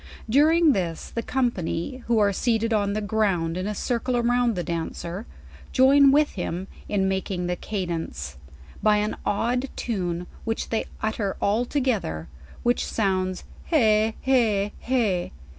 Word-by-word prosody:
During 310 +6 +5
this 175 - -2
the 230 - -2
company 240 -3 -1
who 235 -1 +3
are, 205 -2 +3
seated 230 +1 +1
on 200 -2 +1
the 215 - -1
ground 200 -6 0
in 185 +2 -2
a 210 - -2
circle 245 +3 -1
around 240 -1 +2
the 175 - -2
dancer, 170 +4 -4 0.5
join 275 +2 +6
with 295 +2 +4
him 180 0 -4 0.2
in 195 -2 +1
making 190 -1 -2
the 180 0 -1
cadence, 165 - -4 0.4
by 210 -1 +4
an 210 +1 0
odd 245 +5 0
tune, 180 -6 -2 0.2
which 225 -1 -2
they 225 - 0 0.2
utter 215 -2 -1
all 215 +5 +1
together, 245 - 0
and 70 -4 -14
which 240 0 +2
sounds, 185 -3 -1 0.2
Heh, 220 -7 +3
heh, 220 -6 +2
heh.' 220 -9 0
210 Hz, 145 wpm, -25 LUFS, 185-240 Hz, 0.5 s, join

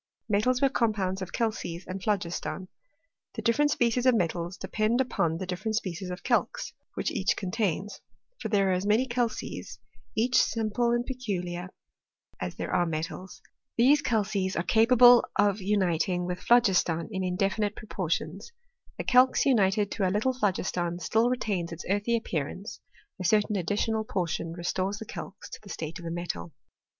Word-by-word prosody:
Metals 250 +5 +2
were 275 - +5
compounds 205 -7 0
of 185 - -5
calces 205 -6 -2
and 185 +1 -6
phlogiston. 185 -2 -2 0.7
The - - -5
different 290 +6 +3
species 245 -1 +1
of 255 - +6
metals 175 -2 -1
depend 220 +3 0
upon 170 -10 0
the 185 - -4
dif 180 0 -5
ferent 220 -1 -1
species 185 -3 -3
of 180 +1 -6
calx - - 0 0.2
which - - -1
each - - +1
contains; 195 0 -2 0.4
for 220 - -4
there 200 -2 +3
are - - +3
as 180 +1 0
many 220 +5 +3
calces 235 -2 -3 0.4
(each 245 +3 +4
simple 230 +1 0
and 240 0 +1
peculiar) 185 -9 -4 0.7
as - - -4
there - - -4
are 175 - +2
metals. 165 +3 -5 0.3
These 275 +5 +5
calces 200 -5 0
are 170 - 0
capable 245 +3 +7
of 205 -1 +2
uniting 185 -3 +1
with 180 0 -3
phlogiston 185 -9 +3
in 190 -2 -2
indefinite 195 +3 0
proportions. 185 - -3 0.5
The - - -3
calx 255 0 +4
united 205 -5 +3
to 195 -4 0
a - - +1
little 215 +7 +1
phlogiston 180 -6 -1
still 220 +7 +2
retains 200 -9 -1
its 165 - -7
earthy 205 +4 +1
appearance 185 0 -4
' - - -28
— - - -55
a - - -2
certain 210 +3 +2
additional 210 +4 0
portion 170 -4 -2
restores 185 +3 -2
the 220 - -7
calx 195 - -8
to - - -7
the 205 - -14
state 165 0 -5
of 170 - -10
a - - -3
metal. 165 - -4
200 Hz, 165 wpm, -28 LUFS, 180-230 Hz, 0.7 s, capable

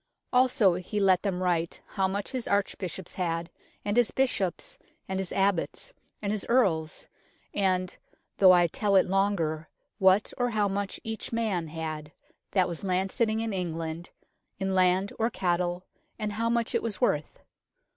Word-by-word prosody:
Also 250 -7 +4
he 180 +4 -3
let 190 -2 +4
them 185 -3 -1
write 170 -2 0
how 190 -1 +1
much 200 +2 -3
his 255 -3 -3
arch 200 0 +1
bishops 185 -1 -5
had, 170 -2 -2 0.3
and 205 0 0
his 240 -2 +4
bishops, 225 -9 -1 0.3
and 190 0 -2
his 190 -2 -3
abbots, 195 - 0 0.3
and 200 - 0
his 210 -2 -1
earls, 175 -10 +1 0.5
and, 185 -2 0 0.4
though 190 -2 +8
I 175 -1 +6
tell 200 +4 0
it 190 - +6
longer, 180 -5 0 0.3
what 190 +1 +4
or 245 0 +2
how 215 -3 +1
much 200 0 -3
each 220 0 -5
man 215 -8 -1
had, 155 -1 -5 0.4
that 185 -3 +2
was 170 - -5
landsitting 195 +4 0
in 225 -2 -2
England, 165 -2 -4 0.5
in 190 0 -1
land 185 +1 +3
or 225 +1 +2
cattle, 175 -3 -1 0.3
and 215 -1 -2
how 230 +3 -1
much 235 -1 0
it - - +2
was 225 -4 -3
worth. 150 - 0
190 Hz, 160 wpm, -28 LUFS, 175-210 Hz, 0.5 s, though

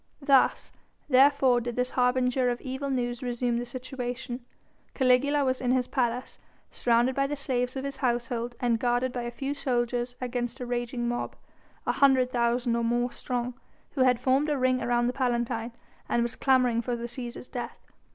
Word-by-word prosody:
Thus, 275 -2 +3 0.4
therefore, 265 -2 +5
did 240 0 -4
this 250 0 -1
harbinger 250 0 +2
of 240 0 -2
evil 265 +1 -4
news 245 -2 -1
resume 245 -1 -1
the 245 - -3
situation. 250 0 -5 0.5
Caligula 275 +2 +3
was 260 0 0
in 250 - 0
his 255 0 +2
palace, 250 -1 -2 0.3
surrounded 240 +2 +2
by 275 0 +1
the 290 - -2
slaves 255 -3 -1
of 265 - -3
his 275 -1 -4
household 240 -2 -1
and 235 -2 +1
guarded 245 +1 +1
by 245 - -2
a 240 - -3
few 270 +4 -3
soldiers 245 -3 -1
against 245 0 -3
a 250 - -4
raging 240 0 -2
mob 240 0 -3 0.5
an - - +1
hundred 265 -2 +4
thousand 240 0 +1
or 235 - 0
more 240 +1 +1
strong 245 0 -3 0.4
who 270 - -2
had 250 -2 +4
formed 265 +4 +2
a 295 - +1
ring 255 -1 +2
around 240 0 +1
the 245 - 0
Palatine, 240 -3 -1 0.4
and 235 - +2
was 235 - -3
clamouring 250 -3 +3
for 245 0 -2
the 235 - -6
Cæsar's 240 0 -5
death. 240 -2 -6
250 Hz, 180 wpm, -28 LUFS, 240-260 Hz, 0.5 s, therefore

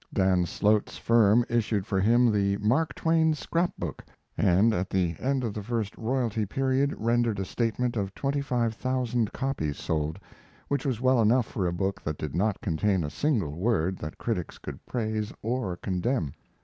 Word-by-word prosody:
Dan 95 -2 +2
Slote's 105 +3 +1
firm 115 0 +4
issued 110 -4 0
for 95 -3 0
him 120 +4 +4
the 100 -1 +1
Mark 125 +10 +1
Twain 160 -1 +2
Scrap 170 +3 -1
book, - - -5 0.3
and 100 +3 +4
at 95 -2 -1
the 90 -3 0
end 135 0 0
of 115 -4 -2
the 105 - -4
first 110 -1 -3
royalty 115 -2 -1
period 135 +6 +1
rendered 115 -2 +1
a 95 - -1
statement 120 +3 -1
of 100 -2 -2
twenty 140 +1 -1
five 120 -4 0
thousand 125 -2 -1
copies 125 - -2
sold, 80 +1 -2 0.5
which 140 0 0
was 125 -4 -1
well 130 -2 +4
enough 115 +3 +4
for 95 -4 -2
a - - 0
book 95 +2 -2
that 75 -1 -3
did 75 -3 -5
not 100 +3 0
contain 95 +1 +1
a 75 - -4
single 105 - 0
word 95 -2 +1
that 75 - -6
critics 105 -8 -3
could - - -9
praise 110 -3 -2
or 115 -6 -2
condemn. 90 - -1
110 Hz, 175 wpm, -27 LUFS, 95-125 Hz, 0.5 s, firm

